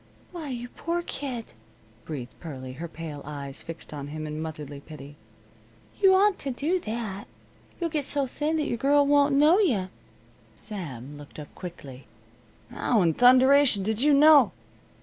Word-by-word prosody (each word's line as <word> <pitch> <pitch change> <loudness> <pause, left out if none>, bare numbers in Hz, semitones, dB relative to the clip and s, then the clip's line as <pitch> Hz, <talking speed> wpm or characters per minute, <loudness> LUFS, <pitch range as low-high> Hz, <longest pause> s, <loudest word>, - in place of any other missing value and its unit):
"Why, 330 -5 -6
you 245 -1 -5
poor 340 +5 -3
kid," 260 -8 -5 0.5
breathed 135 -6 -6
Pearlie, 130 -6 -7
her 165 +6 -6
pale 160 -3 -8
eyes 140 -2 -7
fixed 165 -1 -10
on 145 -1 -6
him 155 +1 -6
in 150 0 -5
motherly 150 -3 -6
pity. 145 -1 -11 0.8
"You 385 -1 +6
oughtn't 400 0 +3
to 275 - -4
do 300 +8 0
that. 215 - -5 0.5
You'll 335 -2 -2
get 295 -3 -1
so 285 -1 0
thin 300 +5 -2
your 295 -6 -1
girl 285 +3 +3
won't 285 0 +4
know 305 +7 +5
you." 225 - +1 0.7
Sam 145 - -7
looked 145 - -13
up 150 -2 -10
quickly. 140 - -10 0.6
"How 220 -6 +1
in 165 -2 +3
thunderation 255 - +5
did 220 +3 -1
you 295 +2 +4
know 285 - +7
220 Hz, 155 wpm, -26 LUFS, -, 0.8 s, know